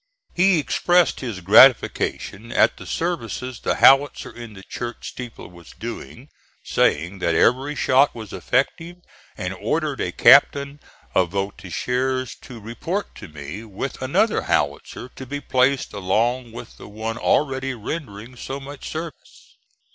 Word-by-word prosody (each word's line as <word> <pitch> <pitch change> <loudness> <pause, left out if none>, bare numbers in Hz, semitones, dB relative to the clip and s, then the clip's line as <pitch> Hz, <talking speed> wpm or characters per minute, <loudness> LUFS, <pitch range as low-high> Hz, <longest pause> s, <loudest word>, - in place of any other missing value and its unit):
He 185 0 +4
expressed 175 +3 +2
his 115 -8 -5
gratification 110 +1 +4
at - - +3
the - - -11
services 130 - -3
the - - -1
howitzer 135 +1 +4
in 120 -2 -9
the 95 - -12
church 120 +4 -6
steeple 125 -3 -9
was 85 -2 -15
doing, 120 +3 -8 0.3
saying 90 +6 0
that 85 -2 0
every 135 - +2
shot 135 +1 +3
was 110 -4 -9
effective, 140 - -1 0.4
and - - -3
ordered - - -2
a - - -2
captain 140 +1 +5 0.3
of 90 -2 +2
voltigeurs 125 +7 -2
to 125 -3 -11
report 140 - -4
to - - -9
me 75 +7 -8
with 105 -4 -6
another - - +1
howitzer - - -2
to 130 - -10
be 145 +2 -4
placed 130 -1 +1
along 115 +5 0
with 115 - -10
the - - -11
one 110 +3 -5
already 135 -2 0
rendering 115 -2 -7
so 135 +3 -6
much 140 +1 -9
service. 160 -1 -9
125 Hz, 140 wpm, -22 LUFS, 105-140 Hz, 0.4 s, captain